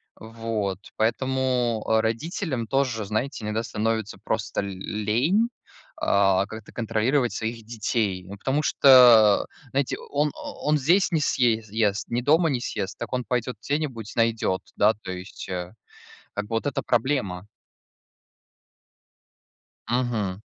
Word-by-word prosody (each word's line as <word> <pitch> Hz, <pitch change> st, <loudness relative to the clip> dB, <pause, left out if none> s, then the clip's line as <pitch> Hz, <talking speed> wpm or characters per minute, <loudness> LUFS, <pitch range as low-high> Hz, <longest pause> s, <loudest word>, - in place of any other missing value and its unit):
Вот. 110 Hz, -4 st, -4 dB, 0.2 s
Поэтому, 125 Hz, 0 st, 0 dB
а, 110 Hz, 0 st, +3 dB
родителям 120 Hz, -, -2 dB
тоже, 130 Hz, -4 st, 0 dB
знаете, 110 Hz, +5 st, -3 dB
иногда 105 Hz, +1 st, -1 dB
становится 110 Hz, -1 st, -2 dB
просто 110 Hz, +1 st, -1 dB
л 100 Hz, -, -4 dB
лень, 110 Hz, -, 0 dB, 0.5 s
а, 95 Hz, -1 st, +3 dB
как-то 110 Hz, 0 st, -10 dB
контролировать 120 Hz, +3 st, 0 dB
своих 115 Hz, 0 st, -4 dB
детей, 105 Hz, -4 st, -1 dB
ну, 100 Hz, +2 st, -8 dB
потому 135 Hz, +8 st, 0 dB
что, 120 Hz, -8 st, +7 dB, 0.3 s
знаете, 135 Hz, -1 st, 0 dB
он 145 Hz, 0 st, +1 dB
он 150 Hz, +1 st, -1 dB
здесь 170 Hz, +8 st, +3 dB
не 165 Hz, -, +2 dB
съе 120 Hz, -6 st, +2 dB
ест, 105 Hz, -1 st, 0 dB
ни 120 Hz, +1 st, 0 dB
дома 160 Hz, +6 st, +3 dB
не 130 Hz, -4 st, 0 dB
съест, 95 Hz, -4 st, -4 dB
так 120 Hz, 0 st, -5 dB
он 125 Hz, 0 st, 0 dB
пойдет 125 Hz, 0 st, -2 dB
где-нибудь 135 Hz, -8 st, -3 dB
найдет, 115 Hz, -5 st, +1 dB
да, 105 Hz, +2 st, +4 dB
то 95 Hz, -, -6 dB
есть, 90 Hz, +1 st, -8 dB
э 90 Hz, 0 st, -4 dB, 0.6 s
Как 105 Hz, -, -3 dB
бы 115 Hz, -, -3 dB
вот 115 Hz, -, -1 dB
это 140 Hz, -, -1 dB
проблема. 110 Hz, -7 st, -1 dB, 2.4 s
Мгм. 115 Hz, -6 st, -1 dB
115 Hz, 130 wpm, -25 LUFS, 105-130 Hz, 2.4 s, что